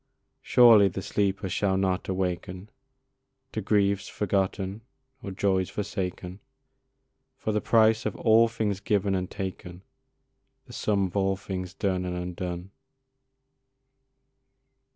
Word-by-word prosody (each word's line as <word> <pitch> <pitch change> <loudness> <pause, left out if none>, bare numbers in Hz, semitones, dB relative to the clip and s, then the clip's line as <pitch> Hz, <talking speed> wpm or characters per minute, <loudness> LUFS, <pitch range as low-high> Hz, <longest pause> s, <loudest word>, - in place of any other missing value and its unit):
Surely 115 -5 +6
the 95 0 -5
sleeper 100 0 -1
shall 95 +1 0
not 95 -1 -1
awaken 95 +1 -3 0.8
To 110 - -3
griefs 100 -1 +1
forgotten 95 +1 -2 0.4
or 100 - -6
joys 95 -1 0
forsaken, 95 -2 -4 1.0
For 110 - -2
the 105 0 0
price 110 -1 +3
of 105 - -4
all 115 0 +4
things 110 -4 -2
given 100 -1 0
and 90 -1 -2
taken, 95 -2 -7 0.8
The - - -13
sum 100 -2 0
of 90 - -7
all 95 -1 +1
things 95 -2 -6
done 95 -3 -1
and 90 0 -3
undone. 90 +1 -5
95 Hz, 115 wpm, -27 LUFS, 95-105 Hz, 1.0 s, Surely